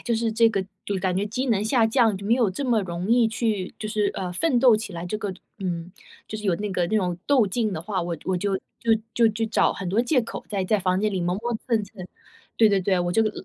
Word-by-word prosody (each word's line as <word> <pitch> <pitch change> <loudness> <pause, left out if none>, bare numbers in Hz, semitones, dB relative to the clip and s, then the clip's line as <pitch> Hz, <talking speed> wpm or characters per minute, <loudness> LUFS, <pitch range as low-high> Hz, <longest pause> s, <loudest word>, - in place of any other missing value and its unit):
就 235 - 0
是 225 0 0
这 225 +1 +5
个， 195 -4 -1 0.2
就 200 - -1
感 185 -1 0
觉 195 +3 0
机 250 +5 -2
能 210 -3 +2
下 225 +1 +3
降， 225 -3 +3
就 200 - -9
没 220 - +1
有 240 -4 +2
这 190 +9 -4
么 240 -4 +2
容 175 +2 -4
易 240 -2 +4
去， 220 -4 -2
就 215 - -4
是， 210 -1 0
呃， 180 -1 -4
奋 250 - +1
斗 240 -2 +6
起 215 -3 -3
来 170 0 -5
这 210 +4 -3
个 205 -3 -3 0.3
嗯， 175 -2 -4 0.3
就 215 - -6
是 210 - -9
有 190 -4 +2
那 205 +1 -3
个 180 -2 0
那 215 +5 0
种 180 -4 -1
斗 260 -7 +4
劲 215 +3 -1
的 160 -5 -4
话， 190 +1 -2
我 170 -1 -3
我 190 - 0
就 195 +2 0 0.2
就 230 -1 +3 0.2
就 230 -2 +4
就 220 +1 -2
找 215 - +2
很 195 - -5
多 210 - +3
借 250 +1 +2
口， 225 - -7
在 195 -3 -1
在 210 +2 +2
房 185 0 +1
间 210 +1 0
里 185 - -1
磨 175 +1 0
磨 235 +3 -3
蹭 220 -3 +2
蹭， 195 -1 -11 0.5
对 225 - +6
对 200 -1 +3
对， 185 0 +1
我 175 0 0
这 225 - +3
个 215 - +1
210 Hz, 295 characters per minute, -24 LUFS, 185-225 Hz, 0.5 s, 斗